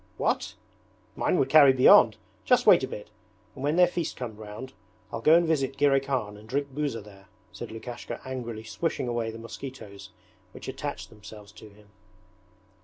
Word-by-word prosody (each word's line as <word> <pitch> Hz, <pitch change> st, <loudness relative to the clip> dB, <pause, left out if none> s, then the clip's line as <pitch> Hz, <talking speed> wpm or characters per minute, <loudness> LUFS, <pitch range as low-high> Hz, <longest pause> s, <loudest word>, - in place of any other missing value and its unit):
'What! -, -, -1 dB, 0.6 s
Mine -, -, +1 dB
would 135 Hz, -, +1 dB
carry 145 Hz, -4 st, +7 dB
beyond. 130 Hz, 0 st, +6 dB, 0.3 s
Just -, -, +3 dB
wait -, -, +6 dB
a -, -, -1 dB
bit, -, -, -9 dB, 0.4 s
and 130 Hz, -, -9 dB
when 145 Hz, +2 st, +1 dB
their 180 Hz, 0 st, +6 dB
feast 175 Hz, -2 st, -3 dB
comes 120 Hz, -4 st, -6 dB
round 110 Hz, +5 st, -9 dB, 0.4 s
I'll 115 Hz, -, -4 dB
go 155 Hz, +6 st, +6 dB
and 170 Hz, 0 st, +4 dB
visit 135 Hz, -5 st, 0 dB
Girey 140 Hz, -1 st, +4 dB
Khan 125 Hz, -7 st, -3 dB
and 110 Hz, +1 st, -15 dB
drink 140 Hz, 0 st, -2 dB
buza 145 Hz, -5 st, -2 dB
there,' 100 Hz, -1 st, -16 dB, 0.2 s
said -, -, -8 dB
Lukashka, 120 Hz, +1 st, -7 dB
angrily 120 Hz, -4 st, -6 dB
swishing 120 Hz, +5 st, -3 dB
away 120 Hz, -2 st, -2 dB
the 110 Hz, -, -8 dB
mosquitoes 115 Hz, -4 st, -9 dB, 0.4 s
which -, -, -10 dB
attached -, -, -6 dB
themselves 105 Hz, -1 st, -13 dB
to 110 Hz, -, -14 dB
him. 105 Hz, 0 st, -21 dB
120 Hz, 175 wpm, -27 LUFS, 110-140 Hz, 0.6 s, carry